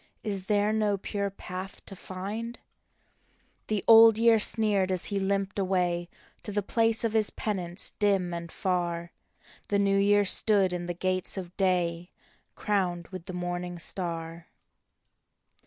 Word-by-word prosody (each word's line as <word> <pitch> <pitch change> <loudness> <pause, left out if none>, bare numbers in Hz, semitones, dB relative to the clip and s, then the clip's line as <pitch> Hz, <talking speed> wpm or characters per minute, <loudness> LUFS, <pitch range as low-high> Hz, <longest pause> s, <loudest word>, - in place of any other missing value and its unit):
Is 195 -3 -3
there 210 0 +2
no 210 -2 +1
pure 200 +1 -3
path 190 0 -8
to 195 - -9
find? 205 +6 -6 0.5
" - - -41
The 210 -2 -1
Old 225 -1 +8
Year 230 -1 +4
sneered 205 -3 +5
as 185 -2 0
he 200 -1 -1
limped 195 +1 -1
away 180 -2 0 0.3
To 210 - -7
the 205 0 -1
place 225 +2 +1
of 225 -2 -1
his 220 -2 +2
penance 185 -4 -4
dim 195 -4 +1
and 170 -1 -6
far. 175 -2 -2 0.6
The 205 - +2
New 200 0 +2
Year 205 +1 +3
stood 195 -1 +3
in 175 -1 -4
the 175 - -4
gates 185 +2 -2
of 180 -1 -7
day, 175 -2 0 0.5
Crowned 180 -5 -2
with 185 -2 -9
the 185 - -6
morning 175 0 -4
star. 170 -1 -4
190 Hz, 150 wpm, -27 LUFS, 175-205 Hz, 0.6 s, Old